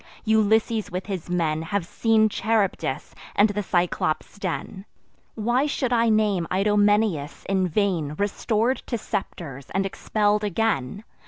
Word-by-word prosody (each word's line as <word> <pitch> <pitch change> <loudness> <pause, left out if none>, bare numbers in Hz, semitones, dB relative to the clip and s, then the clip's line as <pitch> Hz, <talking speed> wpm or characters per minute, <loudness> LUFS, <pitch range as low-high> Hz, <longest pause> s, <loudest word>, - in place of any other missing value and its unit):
Ulysses 220 0 +2
with 180 +1 -4
his 190 -4 -5
men 160 -3 0
Have 175 +2 -2
seen 220 +3 +3
Charybdis 215 -1 -1 0.2
and 205 +2 +5
the 205 0 -2
Cyclops' 175 0 -1
den. 190 +1 -4 0.5
Why 240 +6 +1
should 260 -4 -1
I 230 -1 +3
name 210 -6 +2
Idomeneus, 205 -5 +2
in 190 -1 +1
vain 170 -5 0
Restor'd 220 +4 0
to 235 - -1
scepters, 140 - -5
and 195 +1 0
expell'd 210 +2 0
again? 205 - -1
205 Hz, 130 wpm, -24 LUFS, 180-220 Hz, 0.5 s, and